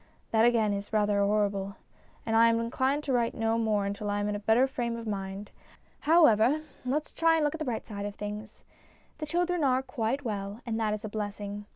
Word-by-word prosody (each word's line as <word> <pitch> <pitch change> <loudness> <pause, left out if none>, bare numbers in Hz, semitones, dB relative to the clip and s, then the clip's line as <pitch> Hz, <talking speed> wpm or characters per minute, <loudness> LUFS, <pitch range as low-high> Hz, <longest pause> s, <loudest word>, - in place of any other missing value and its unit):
That, 225 0 +4
again, 225 -3 +3
is 200 0 -5
rather 205 -1 +2
horrible, 200 -1 0 0.5
and 225 - 0
I 230 +1 +7
am 230 0 +2
inclined 260 +5 0
to 275 - -1
write 235 -2 +1
no 225 0 0
more 215 -3 +1
until 200 +1 -3
I 205 0 0
am 205 - -1
in 210 - -1
a 205 - -3
better 225 +5 +4
frame 240 -3 -3
of 230 - -7
mind. 195 -1 -5 0.5
However, 295 -4 +4 0.2
let's 285 +4 -2
try 330 0 +3
and 320 - +1
look 295 - 0
at 320 - -6
the 310 - -3
bright 235 -4 -3
side 205 -2 -5
of 205 - -7
things. 210 +1 -7 0.6
The 305 - -4
children 350 +1 0
are 260 -1 +2
quite 255 +1 -2
well, 200 -1 -4
and 225 -2 -2
that 215 -1 +1
is 215 +1 -8
a - - -2
blessing. 205 -1 -5
225 Hz, 220 wpm, -29 LUFS, 205-255 Hz, 0.6 s, I